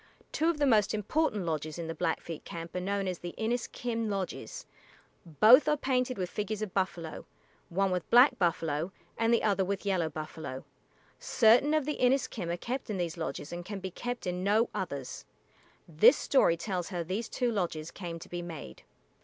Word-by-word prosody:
Two 320 +2 +1
of 335 - 0
the 290 - +2
most 215 -5 +3
important 215 - 0
lodges 155 -1 -3
in 170 - -4
the 165 - -4
Blackfeet 165 -1 -3
camp 165 +1 -8
are - - 0
known 195 +1 -1
as 180 -2 -3
the 175 0 -7
[=I]n[)i]s´k[)i]m 230 0 -2
lodges. 195 -2 -4 0.6
Both 215 - +7
are 300 - +3
painted 255 -2 0
with 185 -2 -1
figures 210 +3 -3
of 205 - -5
buffalo, 175 -4 -3 0.4
one 195 +2 +1
with 180 -2 -2
black 245 0 +6
buffalo, 165 -2 0 0.2
and 225 0 +1
the 235 - +3
other 200 -3 +2
with 200 +2 -3
yellow 185 -5 +1
buffalo. 155 -3 -7 0.5
Certain 250 +6 +4
of 305 -3 +1
the 300 - -2
Inis´kim 245 -8 +1
are 175 - -2
kept 250 +8 -4
in 205 - -2
these 170 -3 -2
lodges 160 -1 -5
and 175 0 -5
can 200 +2 -6
be 190 -1 -5
kept 245 +6 -5
in 180 0 -2
no 215 +4 +3
others. 140 -8 -5 0.6
This 215 - +6
story 170 -11 +3
tells 180 -1 -3
how 175 -3 -3
these 195 +7 -3
two 245 -2 0
lodges 170 -6 -2
came 170 -3 -6
to 165 - -11
be 175 0 -5
made. 160 - -8
190 Hz, 185 wpm, -30 LUFS, 170-230 Hz, 0.6 s, Both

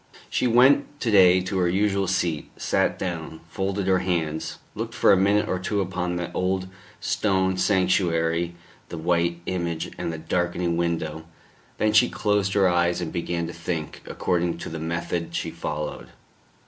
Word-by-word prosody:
She - - +1
went 135 +4 +4
to 115 - 0
day 95 -2 +6
to 95 +1 -2
her 90 -1 +2
usual 100 +1 +1
seat, 85 -4 -1
sat - - +1
down, 80 -3 -4
folded 95 +2 -2
her 95 -1 +3
hands, 80 -4 -2 0.2
looked - - -5
for - - +5
a - - +6
minute 100 +2 +3
or 95 - -1
two 100 +2 -1
upon 90 -2 -2
the 85 -1 -3
old 95 0 -1 0.3
stone 95 -2 +1
sanctuary, 85 -3 +1 0.3
the 85 - -6
white 85 +1 0
image 85 -3 -2
and - - -2
the 80 - -5
darkening 85 +1 -1
window. 80 -2 -2 0.5
Then 110 0 +1
she 120 +3 +5
closed 105 -2 0
her 100 -2 +4
eyes 85 0 +2
and 85 -3 -4
began 85 -1 -2
to - - -6
think, 85 -2 -4
according 85 -1 -1
to 85 - -6
the 80 0 -5
method 85 +1 -3
she - - -2
followed. 75 0 -5
90 Hz, 165 wpm, -25 LUFS, 85-95 Hz, 0.5 s, day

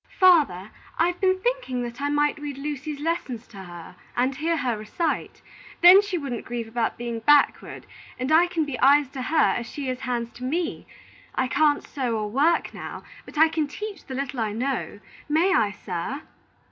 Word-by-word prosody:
"Father, 295 - +4 0.3
I've 350 +2 +1
been 375 -1 +3
thinking 480 - -1
that 240 +2 -7
I 285 - 0
might 295 +1 +1
read 290 -2 -6
Lucy's 290 +1 -5
lessons 290 -7 -3
to - - -13
her 175 -2 -10 0.2
and 255 +2 +2
hear 325 +4 -1
her 250 -5 0
recite. 215 +10 -3 0.4
Then 360 +3 +9
she 405 -3 -3
wouldn't 270 -7 -4
grieve 235 -1 -5
about 225 0 -2
being 235 -1 -4
backward, 295 +4 +2 0.3
and 255 +3 -2
I 335 +3 +6
can 335 -3 -1
be 280 -4 -5
eyes 280 0 +5
to 270 -1 -6
her 310 +5 +3
as 235 - -4
she 280 -3 -5
is 255 0 -3
hands 240 -2 -3
to 250 - -9
me. 325 +6 -2 0.5
I 260 - +1
can't 295 +2 +2
sew 250 -5 -2
or 210 -1 -3
work 300 +8 +2
now, - - -7 0.2
but - - -11
I 320 +2 +7
can 315 -2 -1
teach 420 +7 -7
the 260 - -7
little 265 -2 -3
I 215 -2 -1
know. 245 -2 -3 0.3
May 335 +6 +3
I, 215 - +3
sir?" 205 - -5
280 Hz, 190 wpm, -25 LUFS, 240-320 Hz, 0.5 s, Then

